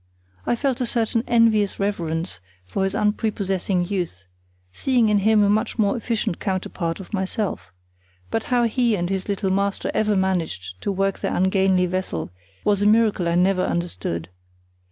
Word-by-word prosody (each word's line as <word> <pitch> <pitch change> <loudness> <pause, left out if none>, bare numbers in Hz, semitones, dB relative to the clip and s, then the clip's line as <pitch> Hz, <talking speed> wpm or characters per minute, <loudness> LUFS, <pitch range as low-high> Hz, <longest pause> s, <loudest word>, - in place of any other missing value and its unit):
I - - +2
felt 260 0 -1
a 245 - 0
certain 230 0 0
envious 225 -4 +3
reverence 170 - -2 0.3
for 90 - -3
this 195 0 0
unprepossessing 200 -4 0
youth, 175 - -3 0.5
seeing 240 - +2
in 210 -1 +3
him 215 +1 +4
a - - +4
much 215 +1 0
more 205 -3 +2
efficient 230 -6 -2
counterpart 185 -3 -2
of 190 +2 -11
myself; 190 - -2 0.6
but 225 - -1
how 245 -1 +2
he 235 0 +2
and 175 -1 -2
his 190 +1 -2
little 195 -1 0
master 200 +1 0
ever 215 -1 +2
managed 160 - -2
to - - -1
work 195 0 0
their - - -2
ungainly 190 0 +3
vessel 180 - -3 0.3
was 205 -1 +2
a 205 - +4
miracle 215 -5 +3
I 170 - +1
never 185 +1 +3
understood. 90 - -3
195 Hz, 160 wpm, -23 LUFS, 180-215 Hz, 0.6 s, him